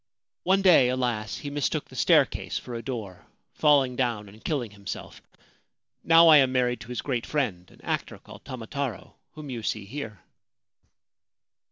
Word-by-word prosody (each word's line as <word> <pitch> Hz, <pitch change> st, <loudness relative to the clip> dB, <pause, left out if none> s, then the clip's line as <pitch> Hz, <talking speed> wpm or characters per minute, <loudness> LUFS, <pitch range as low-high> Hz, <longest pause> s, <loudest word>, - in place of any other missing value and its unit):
One 190 Hz, +2 st, +2 dB
day, 165 Hz, -10 st, +6 dB
alas, 120 Hz, -5 st, -2 dB
he 145 Hz, -, -6 dB
mistook 145 Hz, -1 st, -1 dB
the -, -, -13 dB
staircase -, -, +2 dB
for 125 Hz, -, -7 dB
a 115 Hz, -, -4 dB
door, 110 Hz, -7 st, -6 dB, 0.3 s
falling 140 Hz, -4 st, +3 dB
down 120 Hz, -5 st, -1 dB
and 105 Hz, +3 st, -17 dB
killing 130 Hz, -9 st, -2 dB
himself. 100 Hz, -1 st, -8 dB, 0.8 s
Now 165 Hz, 0 st, +7 dB
I 155 Hz, -2 st, +9 dB
am 135 Hz, -2 st, +4 dB
married 125 Hz, -1 st, +1 dB
to -, -, -10 dB
his 125 Hz, 0 st, -5 dB
great 125 Hz, -4 st, -2 dB
friend, 100 Hz, -, -2 dB
an -, -, -20 dB
actor -, -, -3 dB
called -, -, -14 dB
Tamataro, 125 Hz, -, -5 dB, 0.2 s
whom 150 Hz, -3 st, -8 dB
you 120 Hz, -2 st, -5 dB
see 110 Hz, -1 st, -3 dB
here.' 110 Hz, -2 st, -7 dB
125 Hz, 160 wpm, -26 LUFS, 110-140 Hz, 0.8 s, I